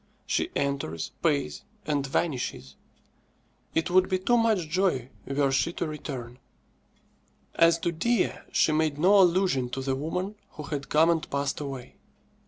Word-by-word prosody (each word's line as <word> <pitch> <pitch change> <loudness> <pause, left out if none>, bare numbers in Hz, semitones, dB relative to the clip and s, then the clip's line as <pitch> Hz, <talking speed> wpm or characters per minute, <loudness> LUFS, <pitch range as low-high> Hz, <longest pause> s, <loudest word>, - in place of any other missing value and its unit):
She 340 - 0
enters, 135 - -2
pays, 145 -5 0 0.2
and 145 -2 0
vanishes. 125 - -2 1.0
It 165 +2 0
would 185 +1 +4
be 185 - +2
too 195 +6 +2
much 220 -8 +2
joy 155 -7 0 0.2
were 140 0 +1
she 135 +5 +1
to - - -2
return. 130 -5 -6 1.1
As 165 0 +5
to 170 +1 -1
Dea, 230 +9 +1 0.2
she - - +3
made 155 -1 +1
no 190 +6 +5
allusion 175 -8 +2
to 135 +2 -4
the 135 0 0
woman 180 +8 -3 0.2
who 150 - -7
had 140 -2 -5
come 160 +3 +5
and 165 -2 -1
passed 140 0 -1
away. 135 -4 -7
155 Hz, 150 wpm, -27 LUFS, 135-175 Hz, 1.1 s, As